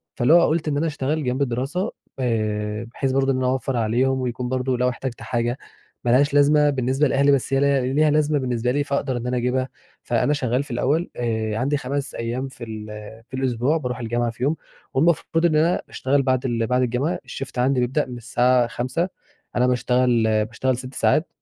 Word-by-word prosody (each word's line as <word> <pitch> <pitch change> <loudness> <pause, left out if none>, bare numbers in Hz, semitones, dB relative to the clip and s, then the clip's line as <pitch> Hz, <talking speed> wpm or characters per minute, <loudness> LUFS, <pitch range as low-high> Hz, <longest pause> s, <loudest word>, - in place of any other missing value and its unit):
فاللي 130 +6 +3
هو 170 0 +7
قُلت 160 0 0
إن 145 -1 0
أنا 165 +2 +1
أشتغل 150 +1 -2
جنب 125 +2 -1
الدراسة 135 +8 -1 0.3
آآ، 105 -2 -1
بحيث 135 -2 -1
برضه 135 0 +2
إن 130 - 0
أنا 130 -1 0
أوفّر 130 0 -1
عليهم 125 +4 +1
ويكون 125 0 -3
برضه 130 -1 0
لو 125 0 +2
احتجت 125 -1 -5
حاجة، 120 +2 -1 0.5
ما 120 - +1
لهاش 140 +3 +4
لازمة 145 +1 +5
بالنسبة 135 +2 +1
لأهلي 140 +2 +3
بس 135 0 +1
هي 135 - +4
ليها 140 -1 +3
ليها 155 +1 +4
لازمة 150 -1 +2
بالنسبة 125 -1 -1
لي، 145 +2 +1
فأقدر 140 -2 -1
إن 120 +1 -4
أنا 125 0 0
أجيبها، 130 +2 0 0.3
فأنا 150 - +1
شغال 130 -1 0
في 140 - -12
الأول 145 +8 0
آآ، 110 -2 -1
عندي 140 +4 +1
5 140 +2 -4
أيام 120 +3 -3
في 130 -2 -11
ال 110 -1 -7 0.4
في - - -26
الأسبوع 130 +4 +1
بارُوح 125 -4 -4
الجامعة 120 0 -1
فيهم، 130 +7 -1 0.4
والمفروض 165 +3 +2
إن 155 -2 +3
أنا 165 +3 +2
أشتغل 140 +2 +1
بعد 130 0 +1
ال 115 -2 0
بعد 125 0 +2
الجامعة 125 +7 0
الshift 135 -1 -7
عندي 130 +1 +2
بيبدأ 130 +5 +1
من 125 -1 -8
الساعة 125 0 +2
17:00 130 +10 -2 0.5
أنا 125 +1 +3
باشتغل 125 -1 +2 0.2
باشتغل 120 +3 -1
6 130 +1 -8
ساعات، 155 +3 +2
130 Hz, 195 wpm, -23 LUFS, 120-140 Hz, 0.5 s, هو